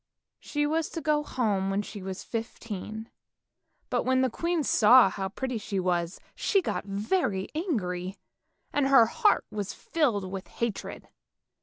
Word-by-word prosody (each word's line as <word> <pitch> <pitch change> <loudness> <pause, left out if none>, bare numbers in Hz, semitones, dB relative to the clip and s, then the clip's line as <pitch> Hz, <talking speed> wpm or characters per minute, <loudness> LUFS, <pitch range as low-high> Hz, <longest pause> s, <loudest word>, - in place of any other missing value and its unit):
She 295 0 -1
was 315 +1 0
to 330 - -2
go 300 -1 +2
home 210 -9 0
when 195 +1 0
she 205 0 -8
was 190 0 -5
fifteen, 220 -1 -6 0.8
but - - +2
when 260 0 +2
the 260 -2 +2
queen 340 +4 0
saw 240 -3 +6
how 190 -1 -3
pretty 250 +3 -3
she 200 -2 -3
was, 175 -1 -1
she 400 - +2
got 355 - -2
very 200 - -1
angry, 195 - -2 0.6
and 290 -2 +2
her 270 -4 +7
heart 415 - +2
was 205 -2 -4
filled 220 - 0
with 190 -1 -6
hatred. 235 -3 -4
220 Hz, 150 wpm, -28 LUFS, 195-290 Hz, 0.8 s, her